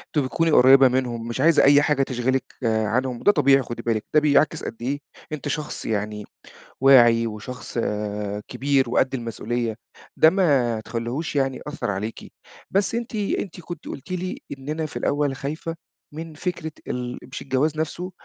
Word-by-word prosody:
تبقي 140 -3 +2
تكُوني 165 -1 +1
قريّبة 135 0 +7
منهُم، 120 -2 -1
مش 120 +3 -3
عايزة 165 +1 +5
أي 145 +1 +7
حاجة 145 -2 +2
تشغلِك 130 +1 0 0.2
آآ 110 -1 +1
عنهم، 125 +2 -1
وده 205 - +5
طبيعي 140 -5 +4
خُدي 120 -1 -6
بالِك، 115 -2 -1
ده 150 - +7
بيعكِس 150 +1 +2
قد 115 - -5
إيه 140 +4 -2 0.3
أنتِ 150 -1 -4
شخص 150 +1 -4
يعني 105 -1 -2 0.6
واعي 120 -4 +6
وشخص 115 +3 -7
آآ 105 -1 -2
كبير 135 -2 +1
وقد 130 +2 +2
المسئولية، 115 -1 -3 0.4
ده 160 - +7
ما 140 - +2
تخلّيهوش 120 +7 -3
يعني 135 -1 +1
يأثّر 150 -8 -3
عليكِ. 105 +4 -5 0.4
بس 200 +3 +1
أنتِ، 235 -1 -4
أنتِ 200 -3 -2
كُنتِ 170 -1 -8
قُلتِ 140 +7 -8
لي 185 0 -3 0.2
إن 135 +2 -10
"أنا 155 +1 -2
في - - -6
الأول 145 -2 0
خايفة 155 +4 -4 0.4
من 160 0 -7
فكرة 170 -1 -4 0.2
ال 125 0 -4
مش 130 +1 -8
الجواز 140 +3 0
نَفْسه، 175 +4 -3
135 Hz, 170 wpm, -23 LUFS, 115-155 Hz, 0.6 s, قريّبة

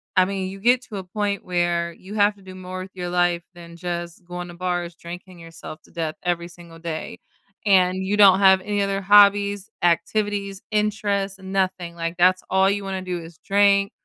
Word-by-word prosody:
I 185 - +5
mean, 190 -1 -3
you 195 +1 -9
get 245 +4 +3
to 210 - -7
a 190 - -5
point 200 +2 -2
where 175 -1 0
you 190 +4 -12
have 205 0 +3
to 200 - -20
do 190 -1 -11
more 185 0 -7
with 190 - -9
your 180 -1 -4
life 175 -1 +1
than 170 -1 -12
just 175 0 -5
going 175 0 -6
to - - -9
bars, 175 -1 -3
drinking 175 +2 -10
yourself 165 -1 -10
to - - -22
death, 160 -2 -3
every 170 -1 -1
single 170 -1 -14
day, 165 -1 -5 0.5
and, 185 -1 +3
you 200 +2 0
don't 195 -2 +7
have 190 -1 +6
any 205 +1 -1
other 195 0 -1
hobbies, 200 0 +5
activities, 200 +3 0
interests, 205 -2 -1
nothing, 190 -2 -2
like, 165 0 -3
that's 185 +1 +4
all 190 +1 +4
you 200 0 -1
wanna 190 -1 -3
do 180 -1 -4
is 165 -1 -12
drink, 200 0 +3
185 Hz, 195 wpm, -23 LUFS, 175-200 Hz, 0.5 s, don't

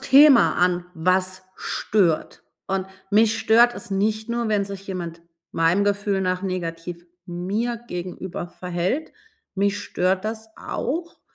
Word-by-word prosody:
Thema 275 -1 +7
an: 180 0 +2
„Was 185 +2 +1
stört?“ 185 -7 0 0.2
Und 190 0 -1 0.2
mich 220 +2 +4
stört 230 +2 +5
es - - -8
nicht 215 +3 0
nur, 235 -1 -1
wenn 205 -2 +2
sich 195 0 -8
jemand 170 -3 -5 0.3
meinem 165 +5 +3
Gefühl 205 -1 +1
nach 185 0 0
negativ 175 -2 -4 0.2
mir 200 +7 -2
gegenüber 180 -1 -5
verhält, 180 - -2 0.4
mich 200 +1 +1
stört 185 -1 0
das 220 0 -4
auch, 335 +5 -4
195 Hz, 125 wpm, -23 LUFS, 180-220 Hz, 0.4 s, Thema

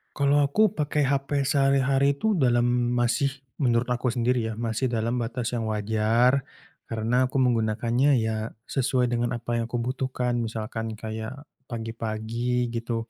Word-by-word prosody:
Kalau 140 0 +3
aku 215 +10 +3
pakai 150 -5 -1
HP 140 +1 0
sehari-hari 135 0 +3
itu 210 +7 0
dalam 120 -2 +2
masih 120 +3 +1 0.2
menurut 125 -3 +1
aku 125 0 0
sendiri 120 -1 +1
ya 110 - -3
masih 115 +2 -2
dalam 120 0 0
batas 120 0 -2
yang 115 - -2
wajar, 110 +5 +2 0.4
karena 115 +3 +1
aku 130 +1 0
menggunakannya 120 +2 +2
ya 110 0 -2 0.2
sesuai 130 -2 +1
dengan 120 0 0
apa 120 0 -2
yang 115 - -1
ku 120 +1 -3
butuhkan 125 0 -1
misalkan 110 -1 -3
kayak 110 +2 -5 0.3
pagi-pagi 115 +1 -2
gitu, 115 -1 -3
120 Hz, 140 wpm, -26 LUFS, 115-130 Hz, 0.4 s, Kalau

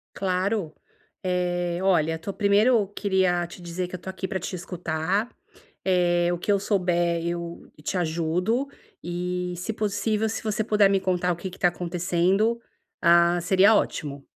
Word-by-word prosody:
Claro. 185 -2 -1 0.5
Eh, 175 -1 -1
olha, 160 -4 +2
tô 195 +5 -5
primeiro 205 +2 +3
queria 190 -3 +1
te 175 +1 -12
dizer 175 +1 -4
que 180 - -10
eu - - -4
tô 190 - -6
aqui 190 0 -5
pra 190 0 -2
te 180 - -5
escutar, 180 +4 -2 0.6
eh, 175 -2 +2
o 175 - -2
que 205 - 0
eu 200 - +3
souber, 175 -4 +1
eu 170 0 -5
te 185 - -2
ajudo 180 - 0 0.3
e, 180 +1 -3
se 180 +6 -4
possível, 215 +1 0
se 225 - -4
você 215 0 -1
puder 210 -2 +4
me 195 - +2
contar 180 -1 0
o - - -4
que 180 +3 -5
que 180 - -13
tá 175 - +4
acontecendo, 180 +6 0 0.4
ah, 170 +1 +5
seria 190 +5 +5
ótimo. 145 -8 -2
180 Hz, 165 wpm, -25 LUFS, 175-200 Hz, 0.6 s, ah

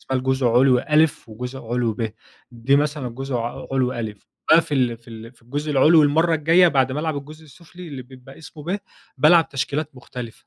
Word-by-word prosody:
اسمها 130 -1 -2
الجزء 130 0 0
علوي 125 +1 +4
أ 155 +2 +4 0.2
وجزء 125 +4 -7
علوي 120 -1 -1
ب. 110 -1 -4 0.4
دي 125 +3 +1
مثلًا 145 -3 -1
جزء 135 +2 -6
ع 120 +1 -5
علوي 130 -2 0
أ، 105 - -14 0.4
باقفل 135 -7 +3
في 115 +1 -21
ال 115 +1 -10
في 125 - -28
الجزء 145 +6 -4
العلوي 150 +3 +5
المرّة 160 +3 +2
الجايّة 165 +3 +4
بعد 135 -3 +1
ما 145 - -2
ألعب 160 -2 -2
الجزء 155 +3 -9
السفلي 170 +4 -13
اللي 135 -4 -7
بيبقى 130 +1 -15
اسمه 160 -1 -12
ب، 190 +4 -2 0.4
بالعب 165 +3 +5
تشكيلات 145 +3 -3
مختلفة 125 -2 -10
135 Hz, 190 wpm, -22 LUFS, 125-155 Hz, 0.4 s, العلوي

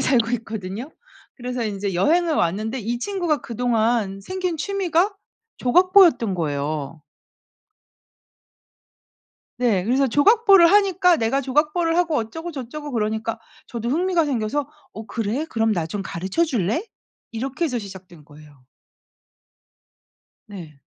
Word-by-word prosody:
살고 235 -3 +2
있거든요. 220 - -7 0.4
그래서 250 -1 -4
인제 200 -2 -3
여행을 325 - +2
왔는데 215 +8 -1
이 235 +3 -3
친구가 350 -3 -1
그동안 225 -4 0
생긴 365 - -3
취미가 385 +2 0 0.4
조각보였던 345 - +4
거예요. 150 -1 -3 2.6
네. 230 -7 +1
그래서 265 +4 +2
조각보를 390 - +5
하니까 375 -4 +4
"내가 230 +5 0
조각보를 300 +5 +1
하고 340 -4 +1
어쩌고저쩌고." 295 +2 -5
그러니까 220 0 -2 0.3
저도 235 0 -5
흥미가 345 +3 +1
생겨서 270 +1 -2 0.2
"어 220 0 -9
그래? 230 +7 -2
그럼 225 -6 +1
나 170 -4 -1
좀 195 +4 -4
가르쳐 190 - -1
줄래?" 240 - -1 0.5
이렇게 265 +8 -3
해서 250 -6 -1
시작된 190 -6 -11
거예요. 145 -2 -17 1.8
네. 170 -9 -11
240 Hz, 280 characters per minute, -22 LUFS, 205-325 Hz, 2.6 s, 조각보를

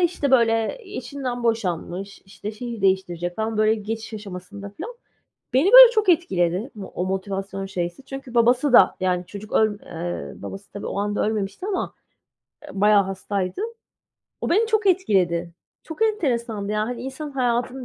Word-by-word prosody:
işte 340 -5 +1
böyle, 225 - +3
eee, 400 +1 -9
eşinden 250 -1 -4
boşanmış, 200 -3 -2
işte, 200 +1 -7
şehir 235 0 -6
değiştirecek. 175 -2 0
Tam 220 0 -2
böyle 215 0 +4
geçiş 220 +1 -5
aşamasında 200 0 -8
filan. 360 - -8 0.6
Beni 290 +10 +3
böyle - - +12
çok 430 -3 +1
etkiledi 195 - +2
mo 205 -3 -7
o 180 - -1
motivasyon 195 +1 -3
şeysi. 175 +4 -4
Çünkü 270 -3 -8
babası 245 +4 +3
da - - +7
yani, 180 -1 0
çocuk 205 +3 -10
öl 215 -2 +2
eee, 175 +1 -6
babası 195 +1 -8
tabii 200 - -6
o - - -3
anda 205 +1 0
ölmemişti 215 - -3
ama, 390 -3 -2 0.7
eee, - - -11
bayağı 205 +1 +4
hastaydı. 195 - -3 0.8
O - - -2
beni 425 +7 +4
çok 435 -2 +1
etkiledi. 180 - +2 0.3
Çok 325 +6 -5
enteresandı 235 - 0
ya, 210 - 0
hani. 235 +2 -4
İnsanın 270 +3 -6
hayatını 250 0 -1
220 Hz, 160 wpm, -23 LUFS, 195-265 Hz, 0.8 s, böyle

